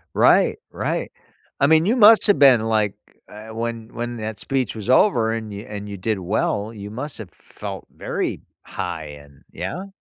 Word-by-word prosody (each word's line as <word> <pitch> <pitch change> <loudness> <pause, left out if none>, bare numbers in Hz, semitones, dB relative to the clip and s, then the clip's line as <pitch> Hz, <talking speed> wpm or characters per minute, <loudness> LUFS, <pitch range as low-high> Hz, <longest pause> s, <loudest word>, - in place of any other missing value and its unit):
Right, - - +4
right, - - -3 0.5
I 140 - +4
mean, 160 +2 +4
you 235 +5 +2
must've 215 -2 +7
been, 130 -5 +7
like 110 -2 0 0.3
uh, 105 +1 -11
when 115 0 -5
when 120 +1 -4
that 110 -2 -5
speech 130 -5 -2
was 110 +1 -7
over 120 - +3
and 110 -2 -5
you 100 +3 -8
and 105 0 -7
you 100 - -6
did 105 +2 -2
well, 100 +3 -1
you 105 -1 -8
must've 110 - -7
felt - - -9
very - - -3 0.2
high 80 -3 -5
and 75 -1 -14
Yeah? 175 - -5
110 Hz, 170 wpm, -22 LUFS, 100-130 Hz, 0.5 s, must've